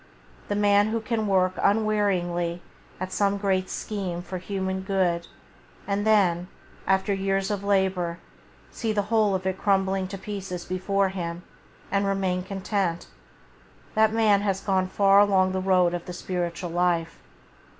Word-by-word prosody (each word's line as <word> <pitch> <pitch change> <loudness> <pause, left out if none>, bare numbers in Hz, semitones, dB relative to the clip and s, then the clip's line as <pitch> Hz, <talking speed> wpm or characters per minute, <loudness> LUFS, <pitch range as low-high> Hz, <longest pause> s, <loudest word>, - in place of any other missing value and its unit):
The 205 - -1
man 205 0 +4
who 225 +1 -1
can 220 -1 -2
work 185 -2 +2
unwearying 190 -5 +1 0.4
at 185 0 -4
some 200 0 +1
great 190 -2 0
scheme 185 -5 -4
for 185 0 -5
human 190 0 -3
good 185 -3 0 0.6
and 205 +1 -1
then, 180 -5 +3 0.4
after 190 +1 +2
years 195 0 0
of 200 -1 -3
labour, 190 -4 +1 0.5
see 225 -2 -2
the 205 -1 +1
whole 215 -3 +3
of 185 0 -4
it 190 0 -1
crumbling 195 -1 +1
to 195 +1 -6
pieces 195 -3 -6
before 195 +1 0
him, 175 -2 -5 0.5
and 200 0 +1
remain 190 -2 0
content, 190 -2 -2 0.8
that 220 0 +4
man 215 -3 +3
has 195 -2 0
gone 190 -2 +1
far 195 +1 +4
along 190 -2 +4
the 190 0 -1
road 185 -2 +3
of 175 -1 -4
the 180 - -6
spiritual 175 -1 -3
life. 170 -1 0
190 Hz, 150 wpm, -25 LUFS, 180-200 Hz, 0.8 s, man